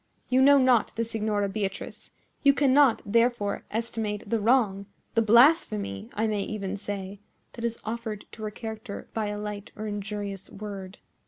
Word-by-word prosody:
You 255 +1 +4
know 280 +1 +7
not 255 -4 +3
the 230 - 0
Signora 215 -3 -1
Beatrice. 195 -1 -4 0.3
You 280 -1 +5
cannot, 275 -3 +4
therefore, 230 -1 +1
estimate 220 -2 -3
the 225 +2 +1
wrong—the 210 -2 +1
blasphemy, 215 - +4
I 220 - +1
may 210 -2 0
even 200 -2 -3
say—that 205 +3 -8
is 235 -1 -1
offered 220 -2 -4
to 220 - -11
her 215 - -2
character 220 0 -7
by 220 -2 -1
a 205 0 -3
light 210 -1 -6
or 215 - -6
injurious 205 -2 -4
word." 195 -2 -8
215 Hz, 150 wpm, -27 LUFS, 200-230 Hz, 0.3 s, know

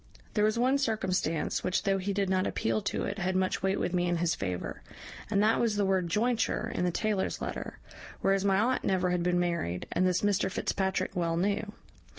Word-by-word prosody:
"There 210 - +2
was 215 +2 +1
one 260 +4 +3
circumstance 185 - 0
which, 185 - 0
though 195 -1 +1
he 195 +2 -2
did 200 0 0
not 185 0 +1
appeal 220 -1 0
to 205 - -2
it, 200 +2 -3
had 185 0 -1
much 185 0 0
weight 195 +1 +1
with 180 - -1
me 175 -1 +1
in 175 0 +1
his 170 0 +1
favour, 90 -2 -4 0.5
and 200 -1 +2
that 220 +1 +3
was 230 -3 +1
the 205 -1 +1
word 190 -2 +1
jointure 225 +6 0
in 180 - 0
the - - +2
taylor's 205 +1 -1
letter, - - -5 0.4
whereas 195 0 +2
my 195 -1 +3
aunt 245 +4 +1
never 185 -1 +1
had 180 -1 +1
been 175 0 +2
married, 170 - -1
and 185 +1 +2
this 180 -1 +1
Mr 200 -2 +2
Fitzpatrick 190 +1 -1
well 170 -2 0
knew. 205 +3 -1
190 Hz, 210 wpm, -29 LUFS, 180-205 Hz, 0.5 s, one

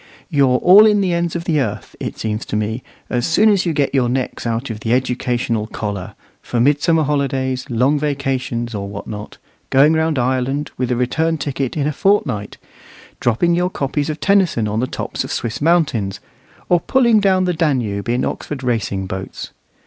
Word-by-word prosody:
You're 135 -4 +3
all 195 +9 +7
in 210 -1 +3
the 185 -3 +1
ends 170 -1 -1
of 170 - -2
the 165 -3 +1
earth, 105 -5 -4
it - - -5
seems 110 0 -3
to - - -3
me, 110 +3 -2 0.3
as 120 -1 0
soon 210 +7 +4
as 195 -3 +2
you - - +2
get 140 -2 0
your 130 -3 +2
necks 125 -1 -2
out 115 +2 -2
of 105 - -6
the 110 +2 -1
educational 125 -3 -1
collar, 100 -4 -5 0.3
for 120 - -2
midsummer 150 +5 +3
holidays, 135 -3 -1
long 130 +5 +2
vacations, 130 -5 -2
or 100 -1 -4
what 100 0 -7
not 105 -1 -8 0.3
going 140 +4 +5
round 160 -1 +1
Ireland, 130 +3 -1
with 125 -1 -2
a 125 - +1
return 160 +7 0
ticket, 140 -2 -3
in 145 - 0
a 150 - 0
fortnight; 165 - 0 0.6
dropping 120 +9 +2
your 180 +1 +1
copies 145 -2 -2
of 155 0 -4
Tennyson 185 - +2
on 105 +1 -1
the 130 - 0
tops - - -4
of - - -7
Swiss 115 +2 -3
mountains; 140 - +1 0.5
or 175 - +4
pulling 235 +1 +3
down 190 -2 +3
the 180 -1 +1
Danube 125 - -1
in 120 +2 +1
Oxford 140 -3 -5
racing 110 -6 -1
boats. 95 0 -6
135 Hz, 185 wpm, -19 LUFS, 115-160 Hz, 0.6 s, all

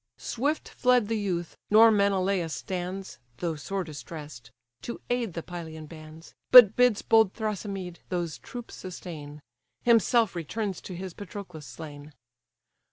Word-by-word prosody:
Swift 285 +6 -2
fled 250 -4 +2
the 225 - +1
youth: 175 -4 -3
nor 225 +2 +8
Menelaus 195 -4 +1
stands 185 +1 -5 0.2
(Though 170 -2 -2
sore 190 +6 -3
distress'd) 145 -5 -9 0.3
to 235 - -6
aid 240 -6 0
the 165 - -5
Pylian 160 -3 -7
bands; 155 +1 -12 0.2
But 240 -5 +10
bids 250 -4 +3
bold 220 -4 +4
Thrasymede 195 -5 -4
those 175 -3 -3
troops 240 -1 -9
sustain; 155 -5 -8 0.4
Himself 230 -2 +4
returns 190 +4 -3
to 185 - -8
his 185 0 -6
Patroclus 180 -6 -9
slain. 145 +3 -10
185 Hz, 130 wpm, -27 LUFS, 160-215 Hz, 0.4 s, But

